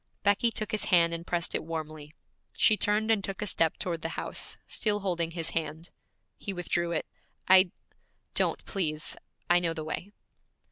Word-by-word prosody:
Becky 205 +3 +4
took 215 -2 -2
his 215 - 0
hand 170 -2 +4
and 170 +1 -5
pressed 175 0 0
it - - -1
warmly. 155 -1 -6 0.4
She 215 - +5
turned 210 +2 +2
and 210 -3 +2
took 195 0 -3
a - - -1
step 165 -5 +1
toward 170 -3 -3
the 165 - -2
house, - - -1
still 210 -1 0
holding 175 -4 0
his 165 -1 -3
hand. 165 +1 -3 0.5
He 200 - -4
withdrew 175 -1 -1
it. 165 - -1 0.4
'I 185 0 +7 0.6
don't, - - +1
please; 155 -6 -1 0.3
I 175 0 +5
know 165 -2 -1
the 160 - -4
way.' 165 +5 -5
175 Hz, 175 wpm, -29 LUFS, 165-200 Hz, 0.6 s, I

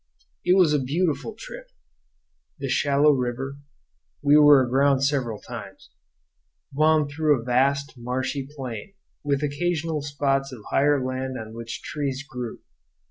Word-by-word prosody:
It 180 +2 +4
was 170 -5 +5
a 150 - +3
beautiful 155 - -1
trip. - - -10 0.9
The 135 -2 -4
shallow 140 +3 +3
river 135 +1 -2 0.7
we 145 - +5
were 145 -3 +7
aground 135 +2 +2
several 130 -6 0
times - - -10 0.8
wound 155 0 +3
through 150 -2 +2
a - - -8
vast, 135 +3 +1
marshy 130 +3 -3
plain, 130 - -6 0.3
with 140 0 0
occasional 160 +1 -1
spots 140 -1 -1
of 120 -5 -10
higher 140 -1 +3
land 130 0 -3
on 110 0 -8
which 115 0 -7
trees 140 -2 -3
grew. 125 -3 -6
140 Hz, 135 wpm, -24 LUFS, 130-150 Hz, 0.9 s, were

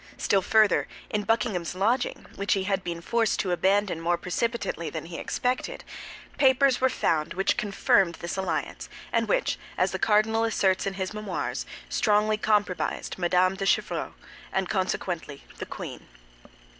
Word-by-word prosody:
Still 195 - +2
further, 215 0 +3 0.2
in 210 -1 -1
Buckingham's 215 -7 0
lodging, 230 +7 0
which 200 +1 +1
he 195 - 0
had 195 -1 -1
been 170 -1 -4
forced 230 +5 +1
to 185 - -2
abandon 190 -1 +2
more 170 +1 +1
precipitately 205 -3 -2
than 160 -1 -5
he 170 0 -7
expected, 250 +1 -2 0.6
papers 265 -1 +4
were 260 - +4
found 160 -10 0
which 195 +1 +2
confirmed 195 -4 +2
this 170 - -5
alliance 190 -4 -3 0.2
and - - +1
which, - - +1 0.2
as - - +2
the - - -3
cardinal 220 +1 +3
asserts 195 -4 +1
in 195 - -2
his 190 0 -3
memoirs, 210 -1 -3 0.2
strongly 215 0 +2
compromised 210 -4 0
Mme. 180 +1 +3
de 195 0 -3
Chevreuse - - 0 0.4
and 190 -1 0
consequently 180 -6 -2 0.2
the - - -5
queen. - - -8
195 Hz, 150 wpm, -27 LUFS, 180-220 Hz, 0.6 s, papers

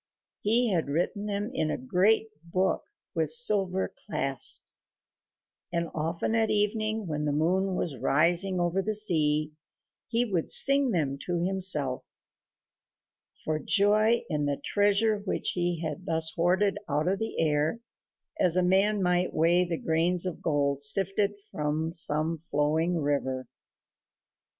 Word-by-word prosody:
He 230 +2 +2
had 170 -6 0
written 175 +7 -2
them 205 +3 -3
in 155 -12 -1
a - - -2
great 200 - +1
book 185 +3 -1 0.3
with - - -1
silver 195 - +2
clasps, 135 -4 -1 0.9
and 170 -1 -2
often 165 +6 -2
at 225 -1 +1
evening, 215 +1 -1
when 150 -3 -3
the 145 - 0
moon 180 +6 0
was 165 -5 -3
rising 175 +7 +1
over 175 +2 0
the 215 +2 -2
sea, 155 -7 +3 0.6
he 235 +1 +2
would 185 -8 -2
sing 275 -1 +4
them 145 - -1
to 175 -1 -1
himself, 180 -9 0 1.4
for 155 -1 -1
joy 215 +7 +3
in 150 -3 -2
the 145 -1 -1
treasure 205 +1 +2
which 200 -1 -2
he 175 -2 -2
had 185 +4 -5
thus 160 -1 0
hoarded 190 +4 +1
out 150 +3 0
of 190 +1 0
the 225 0 -4
air, 155 +5 +1 0.6
as 180 -2 +3
a 185 - +2
man 195 +3 +2
might 180 0 0
weigh 170 +3 +3
the 170 -2 -3
grains 170 +3 +1
of 180 -3 -5
gold 140 -3 0
sifted 195 +7 +2 0.2
from 155 +2 -2
some 160 -1 +1
flowing 160 +3 0
river. 140 -4 -2
175 Hz, 140 wpm, -27 LUFS, 155-200 Hz, 1.4 s, sing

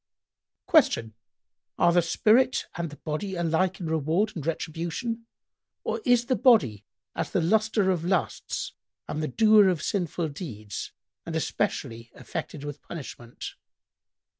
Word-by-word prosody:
Q 115 -1 +4 0.6
"Are 170 - +4
the 175 - +5
spirit[FN#104] 220 +9 +3
and 170 -1 -3
the 150 - -10
body 165 +6 -4
alike 175 +2 +1
in 180 - -4
reward 160 +7 +1
and 160 - -4
retribution, 170 +9 -3 0.6
or - - -2
is 245 -1 +4
the 255 - +1
body, 145 - +4 0.3
as 165 - -2
the 190 - +1
luster 210 +2 +2
of 175 -3 -1
lusts 180 0 -1 0.3
and 155 -3 -4
doer 215 -2 +7
of 175 -4 -1
sinful 175 -5 -1
deeds, 110 - -6 0.3
and 165 - -5
especially 120 -6 -2
affected 155 -3 -6
with 145 0 -6
punishment?" 120 -6 -8
170 Hz, 130 wpm, -27 LUFS, 150-205 Hz, 0.6 s, doer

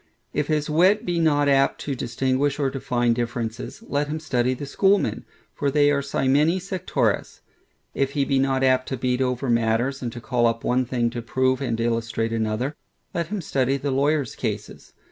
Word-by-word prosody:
If 145 - 0
his 150 -1 0
wit 185 +7 +3
be 175 -1 0
not 145 -3 +3
apt 135 -1 +3
to 145 - -3
distinguish 130 +3 0
or 140 -3 0
find 120 -2 +1
differences, 115 - -4
let 145 -4 -1
him 155 +2 -3
study 130 -4 0
the 145 - -6
Schoolmen; 195 +8 +1 0.3
for 145 - -1
they 145 +1 +4
are 140 -1 +1
cymini 140 +5 +2
sectores. 185 0 -2 0.5
If 135 0 -1
he 140 -2 +1
be 135 -1 +1
not 135 0 +1
apt 130 -1 +3
to 130 - -2
beat 125 +1 0
over 125 +1 -1
matters, 115 +3 +1
and 120 -2 -3
to 120 - -8
call 120 -1 +1
up 115 0 -1
one 125 +1 +1
thing 120 -1 0
to 120 0 -4
prove 130 +3 0
and 115 -4 -1
illustrate 115 -1 -1
another, 115 +5 -1 0.4
let 170 -2 -1
him 205 +2 -3
study 135 -3 0
the 140 +1 -2
lawyers' 140 0 +1
cases. - - -5
135 Hz, 185 wpm, -24 LUFS, 120-145 Hz, 0.5 s, they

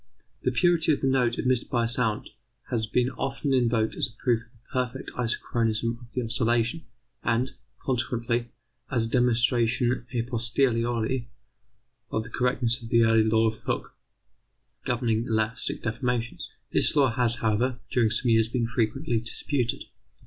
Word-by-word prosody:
The 125 - +1
purity 165 +2 +3
of - - -3
the - - 0
note 125 -3 +2
emitted 125 -1 0
by 120 -1 +1
a - - +1
sound 115 -3 0 0.4
has 110 -3 0
been 125 +4 +1
often 135 +2 -2
invoked 115 -3 +2
as - - +1
a - - -18
proof 120 -3 +2
of 115 0 -22
the 115 -1 -28 0.3
perfect - - -9
isochronism 115 -1 -1
of 120 0 -14
the 125 - -1
oscillation, 120 +5 0 0.4
and, 120 +2 0 0.3
consequently, 120 -2 -1 0.4
as 120 -4 +1
a - - -4
demonstration 120 0 +2
a 120 -2 0
posteriori 120 0 +1 0.8
of 110 - -1
the 115 - -10
correctness 125 -1 0
of 115 - -8
the 115 0 +5
early 115 -1 +5
law 110 0 +3
of 110 - -15
Hoocke - - -3 0.9
governing 115 -2 0
elastic 110 0 0
deformations. 120 +1 -2 0.2
This - - +4
law 140 -4 +4
has, 120 0 +1
however, 120 +3 0
during 120 -3 +3
some 115 +3 +2
years 115 0 +4
been 120 0 0
frequently 115 +2 0
disputed. 120 +1 -2
120 Hz, 155 wpm, -26 LUFS, 115-125 Hz, 0.9 s, the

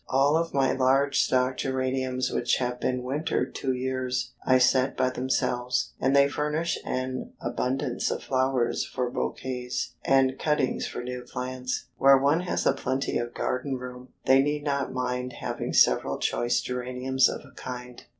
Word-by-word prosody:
All 140 +3 +3
of 165 0 0
my 135 -1 +2
large 135 +2 +2
stock 130 0 +1
geraniums 130 -1 -1
which 120 0 +1
have 125 -1 -2
been 125 0 -1
wintered 145 +5 -1
two 130 -1 -1
years, 130 0 -2
I 130 - +5
set 130 +1 +3
by 130 - +2
themselves, 125 -1 -1
and 135 +2 +2
they 140 0 +6
furnish 150 +3 -1
an 130 0 -3
abundance 125 +2 -1
of - - -3
flowers 130 -2 +1
for 125 -1 -3
bouquets, 125 -1 -3
and 135 -1 +3
cuttings 150 -4 0
for - - -5
new 125 0 -5
plants. 125 +1 -4
Where 135 0 +7
one 140 +4 +3
has 180 0 -2
a - - +5
plenty 135 0 -1
of 120 0 -5
garden 130 +1 -1
room, 125 0 -8 0.2
they 135 0 +6
need 145 +1 -1
not 140 -2 -1
mind 125 0 -2
having - - -4
several - - +4
choice 120 0 0
geraniums 125 +1 +1
of - - -5
a - - -17
kind. 125 -1 -8
130 Hz, 160 wpm, -27 LUFS, 125-135 Hz, 0.2 s, Where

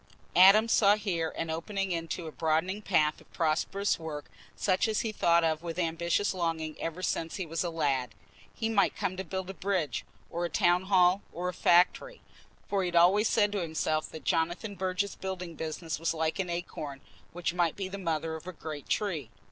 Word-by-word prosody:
Adam 195 +5 +8
saw 205 -2 +5
here 180 -6 -1
an 165 -1 -2
opening 195 +4 -2
into 165 0 -3
a 160 - -6
broadening 165 +6 0
path 155 -7 +1
of - - -22
prosperous 170 +5 0
work 150 -3 -7 0.2
such 190 +2 +1
as 215 -1 0
he 225 - -2
had 215 - -7
thought 170 -1 +4
of 160 -1 +1
with 170 -1 -5
ambitious 170 +3 0
longing 165 -3 -2
ever 165 +3 -4
since 165 -2 -1
he 190 - -3
was 165 +2 -2
a 175 - -1
lad: 135 -8 -1 0.4
he 225 - -2
might 215 -3 +2
come 185 - -2
to 190 - -4
build 190 +1 -4
a 190 - -5
bridge, 180 -9 -1 0.3
or 170 +1 -2
a 175 - -1
town 180 -1 +2
hall, 185 0 +4
or 180 +2 -3
a - - -4
factory, 180 - +3 0.5
for 200 -1 0
he 185 - 0
had 175 - -4
always 190 +6 +5
said 205 -2 +3
to 205 - -1
himself 155 -1 -1
that 160 -3 -9
Jonathan 175 +8 0
Burge's 190 +1 -1
building 185 -3 -5
business 160 0 -4
was 165 0 0
like 160 +3 -1
an 185 -2 -1
acorn, 150 -5 -5 0.3
which 175 0 -2
might 175 -2 +1
be 195 -2 -3
the 200 +1 -6
mother 160 -2 -2
of 160 +2 -9
a 185 - -5
great 155 -3 -7
tree. 165 - -1
175 Hz, 205 wpm, -30 LUFS, 160-190 Hz, 0.5 s, Adam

